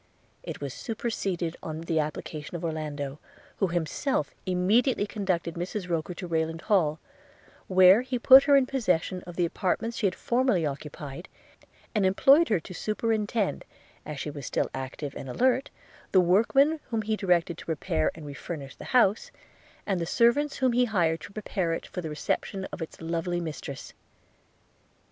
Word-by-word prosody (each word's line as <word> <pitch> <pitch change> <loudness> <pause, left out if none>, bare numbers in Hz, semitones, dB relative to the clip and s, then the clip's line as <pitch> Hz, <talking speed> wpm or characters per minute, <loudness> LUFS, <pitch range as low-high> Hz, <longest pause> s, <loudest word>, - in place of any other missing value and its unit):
It - - -7
was 140 -3 -4
superseded 195 -7 -3
on 160 0 -5
the 165 -1 0
application 150 +1 -4
of 170 - -4
Orlando, 150 -3 -4 0.4
who 195 - +2
himself 170 - -1
immediately 205 +6 +2
conducted 185 -5 -2
Mrs 180 +3 -4
Rokcr 170 0 -2
to 180 +1 -6
Rayland 165 0 -1
Hall; 160 -7 +2 0.7
where 185 +3 +7
he 255 0 -2
put 265 +3 +8
her 285 -1 +6
in 270 - +4
possession 185 -8 0
of 175 - -8
the 175 - +2
apartments 210 +7 -1
she 205 - +2
had 185 - -2
formerly 240 -9 +1
occupied; 145 +2 -6 0.6
and 210 -3 +1
employed 270 - +5
her 210 -5 +3
to 180 - -10
superintend, 215 +1 -1 0.4
as 150 -2 -6
she 150 - -4
was 140 -3 -7
still - - -1
active 135 +2 -5
and 135 - -7
alert, 255 - +2 0.4
the 190 - +7
workmen 230 - +4
whom 225 -2 -1
he 215 +1 0
directed 175 -4 +1
to - - -10
repair 80 - 0
and 160 -2 -10
re 145 - -7
furnish 140 0 -7
the - - -9
house, 210 -3 +3 0.6
and 190 -4 0
the 170 - -2
servants 265 - +3
whom 260 -2 +2
he 250 +1 +4
hired 170 -8 +1
to - - -9
prepare 195 -5 -2
it - - -4
for 180 - -6
the 160 - -5
reception 190 +5 -2
of - - -7
its 160 - -7
lovely 170 +2 -2
mistress. 155 -4 -6
180 Hz, 165 wpm, -27 LUFS, 160-220 Hz, 0.7 s, put